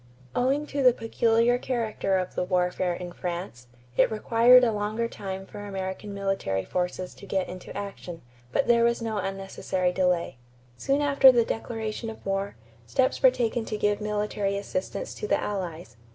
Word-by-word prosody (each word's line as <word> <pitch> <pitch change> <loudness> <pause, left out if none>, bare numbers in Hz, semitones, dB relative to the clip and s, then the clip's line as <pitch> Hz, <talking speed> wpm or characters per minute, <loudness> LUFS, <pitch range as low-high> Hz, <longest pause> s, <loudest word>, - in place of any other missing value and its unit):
= - - -25
Owing 270 +4 +1
to 285 -1 -3
the 250 -2 +6
peculiar 230 +1 +2
character 225 -6 -1
of 185 -1 -3
the - - -1
warfare 180 0 0
in 175 0 -7
France, 175 -9 -5 0.3
it - - +4
required 235 +3 +5
a 235 - +4
longer 215 +2 -1
time 195 -3 -6
for 205 - -10
American 195 0 -5
military 195 - -1
forces 180 0 -3
to 200 - -13
get 190 -1 0
into 185 +1 -8
action; 195 -4 -7 0.3
but - - +1
there 235 -1 +5
was 235 0 +2
no 220 -2 -2
unnecessary 190 -1 -2
delay. 180 -6 0 0.4
Soon 275 - 0
after 280 -2 +7
the 235 -2 +3
declaration 225 0 -4
of 220 - -10
war, 195 +1 -2 0.3
steps 260 - +1
were 260 - +8
taken 240 -2 -1
to 215 - -3
give 205 0 +1
military 210 -1 -1
assistance 200 - -4
to 425 - -5
the - - +2
Allies. 170 - -5
205 Hz, 170 wpm, -27 LUFS, 185-235 Hz, 0.4 s, were